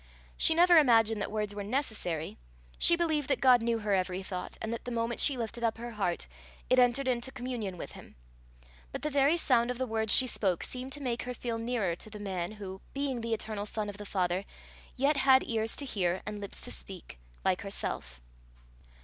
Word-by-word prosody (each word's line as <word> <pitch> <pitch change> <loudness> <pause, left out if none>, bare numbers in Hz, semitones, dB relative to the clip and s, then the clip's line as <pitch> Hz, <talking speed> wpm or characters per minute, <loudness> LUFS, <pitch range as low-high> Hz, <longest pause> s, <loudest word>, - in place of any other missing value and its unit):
She 320 - +3
never 345 0 +7
imagined 225 -6 +4
that - - -2
words 210 -1 -2
were 205 0 -4
necessary; 205 - -2 0.4
she 340 - +6
believed 315 -5 0
that 270 - +1
God 250 -2 +6
knew 230 0 +1
her 210 -2 -1
every 185 0 0
thought, 185 -1 -6
and 220 +1 -3
that 230 - -5
the - - -5
moment 235 0 -1
she 280 -3 +4
lifted 235 0 -4
up 225 -1 +1
her 240 +1 -6
heart, 195 -6 -2 0.5
it 255 - +6
entered 250 +2 +3
into 250 +1 0
communion 245 -8 -4
with - - -7
him; - - -13 0.8
but - - -6
the 300 - -1
very 285 +4 +4
sound 245 -7 +3
of 250 - -2
the 260 - -1
words 220 -2 0
she 260 - +7
spoke 190 -8 0
seemed 255 +1 -4
to 290 - -4
make 245 -3 -1
her 250 0 -5
feel 230 -1 -3
nearer 225 -7 -1
to 215 - -9
the 210 0 -9
man 190 -2 -3
who, 190 -2 -8
being 275 -3 -1
the 230 0 0
eternal 215 -1 -4
Son 210 -1 -3
of 200 - -8
the 205 - -8
Father, 185 -1 0 0.5
yet 280 +3 +2
had 265 -1 +6
ears 225 -1 -1
to 285 - -3
hear 185 -7 -1
and 210 -1 -5
lips 200 - -7
to - - -5
speak, 180 - -8 0.3
like - - +2
herself. 65 0 -4
230 Hz, 210 wpm, -30 LUFS, 205-255 Hz, 0.8 s, never